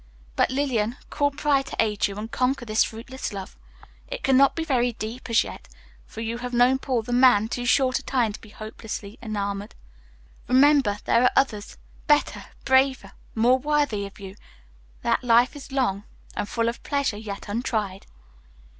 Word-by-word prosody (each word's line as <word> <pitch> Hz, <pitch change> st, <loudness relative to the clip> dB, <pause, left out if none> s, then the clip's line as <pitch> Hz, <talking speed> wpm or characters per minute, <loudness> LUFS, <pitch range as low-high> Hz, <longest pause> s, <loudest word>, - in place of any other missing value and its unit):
But, -, -, +2 dB
Lillian, 255 Hz, -4 st, -1 dB
call 290 Hz, -1 st, +2 dB
pride 280 Hz, -1 st, 0 dB
to -, -, -6 dB
aid 210 Hz, -2 st, +2 dB
you, 200 Hz, 0 st, -8 dB
and 220 Hz, +2 st, -6 dB
conquer 255 Hz, 0 st, 0 dB
this 215 Hz, -1 st, +3 dB
fruitless 255 Hz, +4 st, -6 dB
love. 195 Hz, -2 st, -7 dB, 0.5 s
It -, -, -6 dB
cannot 270 Hz, +1 st, +4 dB
be 325 Hz, -, -2 dB
very 245 Hz, -6 st, +1 dB
deep 225 Hz, +4 st, -7 dB
as 230 Hz, -, +4 dB
yet, -, -, -10 dB, 0.4 s
for 225 Hz, -, -8 dB
you 230 Hz, +1 st, -3 dB
have 245 Hz, 0 st, -4 dB
known 250 Hz, +2 st, +4 dB
Paul, 255 Hz, -4 st, -1 dB
the 245 Hz, -, -4 dB
man, 245 Hz, -4 st, +5 dB
too 245 Hz, 0 st, -3 dB
short 255 Hz, 0 st, +3 dB
a -, -, -13 dB
time 240 Hz, -5 st, 0 dB
to -, -, -10 dB
be 225 Hz, -, -14 dB
hopelessly 215 Hz, 0 st, -8 dB
enamored. 205 Hz, -2 st, -4 dB, 0.7 s
Remember, 260 Hz, -5 st, +4 dB
there 235 Hz, -, +3 dB
are 250 Hz, -, +5 dB
others, 215 Hz, -6 st, 0 dB, 0.3 s
better, 295 Hz, 0 st, +2 dB, 0.2 s
braver, 265 Hz, -6 st, +2 dB, 0.2 s
more 245 Hz, +3 st, +4 dB
worthy 285 Hz, -8 st, 0 dB
of 200 Hz, -, -16 dB
you; 195 Hz, -1 st, -9 dB, 0.7 s
that -, -, +1 dB
life 240 Hz, +3 st, +4 dB
is 285 Hz, -1 st, -10 dB
long, 220 Hz, -7 st, 0 dB, 0.3 s
and 205 Hz, -, -3 dB
full 230 Hz, -1 st, 0 dB
of 235 Hz, -, -3 dB
pleasure 280 Hz, -7 st, -1 dB
yet 205 Hz, -2 st, -7 dB
untried." 205 Hz, -3 st, -3 dB
240 Hz, 170 wpm, -24 LUFS, 215-265 Hz, 0.7 s, man